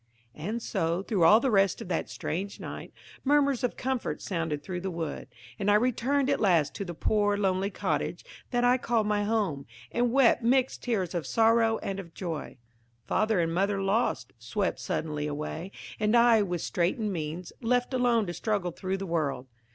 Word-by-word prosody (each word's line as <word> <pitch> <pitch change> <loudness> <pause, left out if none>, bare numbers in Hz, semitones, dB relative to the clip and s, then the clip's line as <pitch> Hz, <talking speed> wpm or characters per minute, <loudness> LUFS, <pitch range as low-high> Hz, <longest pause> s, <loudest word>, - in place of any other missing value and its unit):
And 215 +9 -4
so, 165 +3 -1
through 195 -6 +2
all 210 +7 +8
the 260 +1 0
rest 195 -2 +3
of - - -7
that 170 - -1
strange 195 +5 -4
night, - - -7 0.3
murmurs 280 -2 +2
of 245 - -1
comfort 260 -1 -2
sounded 165 -5 -3
through 180 -2 -4
the 190 - -3
wood, 165 -5 -4 0.3
and 200 - 0
I 205 - +6
returned 255 +4 +1
at 280 0 +1
last 170 -8 +3
to - - -3
the 175 -2 -6
poor 205 +2 +1
lonely 190 -1 +1
cottage 195 - -2 0.2
that 245 -1 0
I 250 +1 +4
called 230 -3 +1
my 210 -1 +1
home, 205 -11 -1 0.2
and 240 0 +1
wept 255 -2 +4
mixed 255 +2 +2
tears 195 -8 -1
of 170 -3 -3
sorrow 225 0 +3
and 195 0 -3
of 170 -4 -10
joy. 165 -7 -5 0.5
Father 215 -2 +1
and 165 -1 0
mother 195 +3 +1
lost, 200 +5 0
swept - - -2
suddenly 150 -2 -2
away, 150 +5 -5 0.3
and 215 +2 +3
I, 235 -2 +6
with 175 -4 -2
straitened 195 +4 0
means, 165 +1 -5
left 245 +2 +1
alone 240 -3 +2
to 175 - -4
struggle 200 -3 -1
through 190 +3 -3
the 195 - -5
world! 150 -7 -1
200 Hz, 180 wpm, -28 LUFS, 175-235 Hz, 0.5 s, all